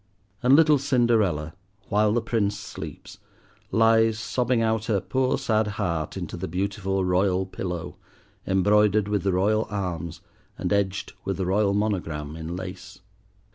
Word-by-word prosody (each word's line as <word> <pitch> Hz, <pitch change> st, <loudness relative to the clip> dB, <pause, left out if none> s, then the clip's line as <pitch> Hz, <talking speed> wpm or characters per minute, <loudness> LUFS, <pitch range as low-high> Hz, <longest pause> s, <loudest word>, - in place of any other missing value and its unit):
And 130 Hz, +2 st, +6 dB
little 155 Hz, -2 st, +5 dB
Cinderella, 110 Hz, -, +1 dB, 0.4 s
while 105 Hz, 0 st, +3 dB
the 115 Hz, +1 st, +1 dB
Prince 105 Hz, -3 st, 0 dB
sleeps, 105 Hz, -, -9 dB, 0.5 s
lies 115 Hz, 0 st, +4 dB
sobbing 120 Hz, +2 st, 0 dB
out 110 Hz, -1 st, +1 dB
her 110 Hz, -4 st, +1 dB
poor 130 Hz, +8 st, 0 dB
sad 110 Hz, -1 st, +1 dB
heart 85 Hz, -7 st, -2 dB
into -, -, -5 dB
the -, -, -4 dB
beautiful 95 Hz, +2 st, -1 dB
royal 90 Hz, +1 st, +2 dB
pillow, 90 Hz, -2 st, -5 dB, 0.5 s
embroidered 105 Hz, +2 st, +3 dB
with 105 Hz, -1 st, 0 dB
the 95 Hz, 0 st, 0 dB
royal 105 Hz, +4 st, +2 dB
arms 90 Hz, -5 st, -4 dB, 0.4 s
and -, -, -1 dB
edged 100 Hz, -1 st, -1 dB
with 95 Hz, -2 st, -2 dB
the 95 Hz, -, -1 dB
royal 100 Hz, +2 st, +2 dB
monogram 80 Hz, -8 st, -2 dB
in 80 Hz, +1 st, -5 dB
lace. 95 Hz, +2 st, -8 dB
100 Hz, 140 wpm, -25 LUFS, 90-110 Hz, 0.5 s, And